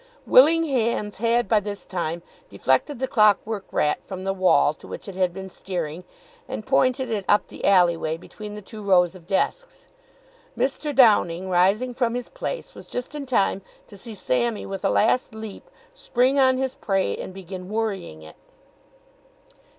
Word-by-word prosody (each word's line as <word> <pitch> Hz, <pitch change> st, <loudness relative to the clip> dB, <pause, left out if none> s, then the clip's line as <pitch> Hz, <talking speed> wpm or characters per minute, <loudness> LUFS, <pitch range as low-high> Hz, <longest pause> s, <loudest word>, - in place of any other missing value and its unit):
Willing 325 Hz, +5 st, +6 dB
hands 235 Hz, -7 st, -1 dB
had 235 Hz, 0 st, +2 dB
by 215 Hz, +1 st, +4 dB
this 205 Hz, 0 st, -6 dB
time 170 Hz, -2 st, -3 dB, 0.3 s
deflected 290 Hz, -3 st, 0 dB
the 260 Hz, +2 st, -2 dB
clockwork 215 Hz, -4 st, +2 dB
rat 150 Hz, -, +1 dB
from 185 Hz, -1 st, -7 dB
the 195 Hz, 0 st, -1 dB
wall 185 Hz, -5 st, +3 dB
to -, -, -15 dB
which -, -, -8 dB
it 195 Hz, -, -6 dB
had 185 Hz, -1 st, +1 dB
been 190 Hz, +2 st, -8 dB
steering, 175 Hz, -3 st, -5 dB, 0.4 s
and 215 Hz, -, -6 dB
pointed 260 Hz, -1 st, +1 dB
it 210 Hz, -3 st, -1 dB
up 205 Hz, -, +4 dB
the -, -, -11 dB
alley 180 Hz, -3 st, +5 dB
way 160 Hz, -1 st, -3 dB
between 210 Hz, +4 st, -10 dB
the 210 Hz, -, -9 dB
two 215 Hz, +2 st, -10 dB
rows 180 Hz, -3 st, +3 dB
of 175 Hz, -3 st, -14 dB
desks. -, -, -2 dB, 0.7 s
Mr. 280 Hz, +3 st, -1 dB
Downing, 190 Hz, -7 st, +4 dB
rising 200 Hz, +8 st, +2 dB
from 240 Hz, -1 st, 0 dB
his 245 Hz, 0 st, -4 dB
place, -, -, -5 dB
was -, -, -12 dB
just 245 Hz, +3 st, -5 dB
in 290 Hz, -2 st, -6 dB
time 200 Hz, -5 st, +1 dB, 0.2 s
to -, -, -14 dB
see 220 Hz, +3 st, -9 dB
Sammy 215 Hz, -, -1 dB
with 195 Hz, 0 st, -6 dB
a 195 Hz, -, +2 dB
last 230 Hz, +2 st, +2 dB
leap 220 Hz, -2 st, -9 dB, 0.2 s
spring 260 Hz, -, +1 dB
on 260 Hz, -1 st, +4 dB
his 265 Hz, 0 st, -1 dB
prey 195 Hz, -2 st, -1 dB
and -, -, -7 dB
begin 185 Hz, 0 st, -8 dB
worrying 200 Hz, -, -3 dB
it. 80 Hz, 0 st, -13 dB
210 Hz, 175 wpm, -24 LUFS, 185-245 Hz, 0.7 s, Willing